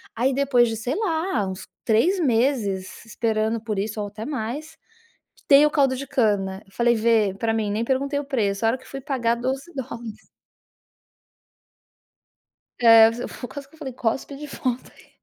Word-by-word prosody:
aí 255 +4 +1
depois 260 -3 +3
de 225 - -3
sei 245 +6 -2
lá 330 - 0
uns 190 0 -7 0.2
3 320 - +3
meses 230 - 0
esperando 220 0 -1
por 215 -3 -4
isso 215 +1 -3
ou 205 - -3
até 215 +2 -8
mais, 295 +4 -5 0.7
tem 285 +1 +7
o - - +3
caldo 270 -3 +2
de 275 0 -6
cana. 200 -6 0
Falei: 235 +3 +2
"Vê 220 -3 +2
pra 225 -1 0
mim.", 215 -2 -1
nem 220 +3 -1
perguntei 275 +2 0
o - - -4
preço 220 -6 -1
a - - +5
hora 255 - 0
que 260 - -18
fui 270 0 -7
pagar 250 -5 0
12 265 +7 -4
dólares. 235 -4 -7 2.6
Eh, 225 -1 +8 0.2
fu 245 - -8
quase 280 -1 -9
que 320 - -20
eu - - -23
falei: 265 -4 -6
"Cospe 250 +4 -2
de 295 +1 -8
volta 255 -3 -4
aí". - - -20
240 Hz, 175 wpm, -23 LUFS, 220-275 Hz, 2.6 s, Eh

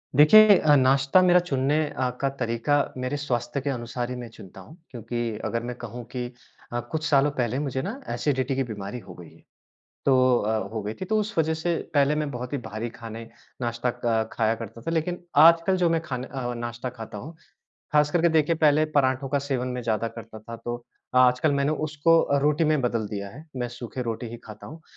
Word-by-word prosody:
देखिए 205 +8 +8
अ, 150 -1 +4
नाश्ता 135 +5 +4
मेरा 180 -1 +6
चुनने 140 -4 0
अ, 130 -1 -1
का 135 - +2
तरीक़ा 115 +4 0 0.2
मेरे 130 +3 -2
स्वास्थ्य 130 -2 -2
के 140 - -2
अनुसार 120 -1 -3
ही 125 - -4
मैं 120 -1 -7
चुनता 95 0 -12
हूँ 100 - -14 0.2
क्योंकि 120 -2 -4
अगर 115 0 -2
मैं 120 0 -5
कहूँ 120 +1 -6
कि 125 -1 -2 0.5
अ, 120 - 0
कुछ 155 +7 -4
सालों 145 0 +4
पहले 125 -2 -1
मुझे 135 -3 -2
ना 205 - -5
एसिडिटी 135 -2 0
की 135 - +1
बीमारी 105 -1 -6
हो 95 - -12
गई 85 -3 -12
है, - - -21 0.6
तो 130 -2 +4
अ, 110 -2 -1
हो 110 - -2
गई 105 +2 -3
थी। - - -2
तो 215 +4 +1
उस 215 -1 -4
वजह 160 0 +2
से 165 +2 -1 0.2
पहले 145 0 +3
मैं 150 -1 -1
बहुत 125 +1 -6
ही - - +1
भारी 110 +3 -4
खाने 115 -1 -9 0.3
नाश्ता 120 +1 -1
क 110 -1 +1
खाया 110 0 +1
करता 115 0 -9
था, 165 - -3
लेकिन 170 +2 -2 0.2
आजकल 170 +3 +4
जो 175 -2 +2
मैं 165 -1 +1
खाने 130 -5 -5
अ, 125 -3 -4
नाश्ता 120 +1 -4
खाता 115 -4 -9
हूँ, 155 +10 -9 0.6
ख़ास 150 0 +4
कर 175 - +2
के 170 - +4
देखिए 160 0 +2
पहले 155 -1 +4
पराठों 130 -1 +2
का 140 +1 +1
सेवन 135 -3 -2
मैं 125 0 -4
ज़्यादा 115 0 0
करता 115 -1 -10
था, 115 +2 -9
तो 120 +1 -6 0.3
आजकल 125 +4 +4
मैंने 140 +1 +1
उसको 155 +2 +3
अ, 140 - +1
रोटी 150 +3 +2
में 155 -1 +2
बदल 115 -3 -1
दिया 100 -1 -5
है, 145 +10 -12
मैं 125 -1 -2
सूखे 120 +1 -6
रोटी 115 0 -3
ही 120 - -7
खाता 110 -1 -11
हूँ। 160 +2 -11
130 Hz, 215 wpm, -25 LUFS, 115-150 Hz, 0.6 s, देखिए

